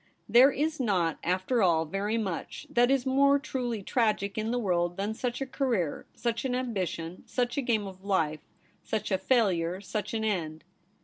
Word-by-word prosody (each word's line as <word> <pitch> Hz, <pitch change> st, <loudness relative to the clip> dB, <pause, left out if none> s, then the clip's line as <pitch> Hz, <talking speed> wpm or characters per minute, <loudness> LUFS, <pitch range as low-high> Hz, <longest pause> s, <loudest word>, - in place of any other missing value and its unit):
There 245 Hz, +5 st, +7 dB
is 310 Hz, +3 st, -1 dB
not, 185 Hz, -, +1 dB
after 185 Hz, +7 st, +1 dB
all, 165 Hz, -4 st, +3 dB
very 200 Hz, +7 st, -1 dB
much 195 Hz, -7 st, -4 dB
that 245 Hz, +1 st, +4 dB
is 270 Hz, -1 st, +2 dB
more 280 Hz, +2 st, +4 dB
truly 245 Hz, -6 st, -3 dB
tragic 210 Hz, -3 st, 0 dB
in 220 Hz, 0 st, -2 dB
the 245 Hz, -, 0 dB
world 175 Hz, -5 st, 0 dB
than 205 Hz, +2 st, -1 dB
such 245 Hz, +3 st, -3 dB
a -, -, 0 dB
career, 240 Hz, -, -1 dB
such 235 Hz, -1 st, -2 dB
an 255 Hz, -2 st, -1 dB
ambition, 185 Hz, -8 st, -3 dB
such 245 Hz, -1 st, -1 dB
a 280 Hz, -, +1 dB
game 225 Hz, -5 st, 0 dB
of 190 Hz, -1 st, -10 dB
life, 160 Hz, -6 st, 0 dB, 0.4 s
such 215 Hz, -1 st, -3 dB
a 190 Hz, -, +2 dB
failure, 190 Hz, -6 st, +1 dB
such 210 Hz, +2 st, -4 dB
an 220 Hz, -, -1 dB
end. 160 Hz, -7 st, -2 dB
215 Hz, 180 wpm, -29 LUFS, 185-245 Hz, 0.4 s, There